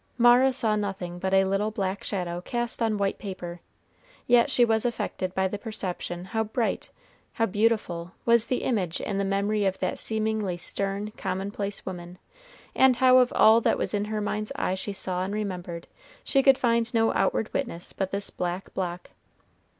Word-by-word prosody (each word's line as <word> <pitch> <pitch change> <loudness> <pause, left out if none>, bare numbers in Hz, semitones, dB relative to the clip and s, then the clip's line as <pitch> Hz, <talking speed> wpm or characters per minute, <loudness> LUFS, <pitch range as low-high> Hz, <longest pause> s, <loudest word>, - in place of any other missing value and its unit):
Mara 245 +2 +6
saw 225 -4 0
nothing 190 -4 -3
but 190 +1 -1
a 195 0 +5
little 195 +2 0
black 195 -2 -3
shadow 175 -3 -3
cast 240 +4 -3
on 220 -2 +1
white 200 -1 -1
paper, 175 -3 -7 0.6
yet 240 +2 +5
she 245 -3 +4
was 225 -1 +1
affected 190 -6 -2
by 190 0 +2
the 200 +2 -5
perception 185 -5 -4
how 220 +3 -1
bright, 220 +2 -2 0.4
how 225 - +1
beautiful, 205 -5 0
was 235 -1 +4
the 250 - -1
image 185 -9 0
in 200 -1 -2
the - - +1
memory 200 +2 0
of 190 -1 +1
that - - -2
seemingly 215 -4 -1
stern, 200 +4 -3
commonplace 200 +1 -3
woman, 180 -1 -7 0.6
and 265 -1 +5
how 255 0 +6
of 250 -1 +3
all 220 +2 +6
that - - +2 0.2
in 205 0 0
her 215 0 -2
mind's 210 +2 -2
eye 275 -9 0
she 190 +2 -4
saw 185 -2 -2
and 195 +2 -3
remembered, 180 -5 -4 0.4
she 275 - +2
could 270 -1 +6
find 235 -2 +1
no 225 0 +3
outward 220 - 0
witness 205 -11 -3
but 195 -1 -2
this 200 +1 -3
black 180 +1 -4
block. 180 -2 -4
205 Hz, 175 wpm, -26 LUFS, 185-225 Hz, 0.6 s, Mara